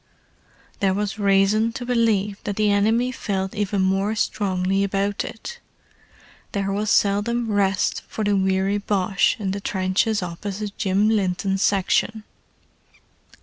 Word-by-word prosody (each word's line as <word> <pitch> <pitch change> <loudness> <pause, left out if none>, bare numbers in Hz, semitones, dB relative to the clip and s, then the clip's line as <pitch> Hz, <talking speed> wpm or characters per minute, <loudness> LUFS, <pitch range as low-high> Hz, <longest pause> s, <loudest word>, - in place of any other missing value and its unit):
There 195 -2 +2
was 210 +1 -3
reason 200 +3 +3
to 245 - -6
believe 220 -5 +1
that 205 - -2
the 210 0 +2
enemy 225 +5 +2
felt 190 -5 -3
even 205 -2 0
more 195 +3 +1
strongly 195 -2 0
about 200 +1 -1
it—there 210 - -9
was 205 +2 -1
seldom 220 +3 +1
rest 195 -2 +1
for 220 - -4
the 205 -1 +2
weary 190 +1 +1
Boche 195 -1 +1
in 195 -3 -2
the 200 +1 -4
trenches 195 +2 0
opposite 200 +4 -5
Jim 195 +1 +1
Linton's 195 -2 0
section. 205 +3 +1
200 Hz, 125 wpm, -23 LUFS, 195-215 Hz, -, reason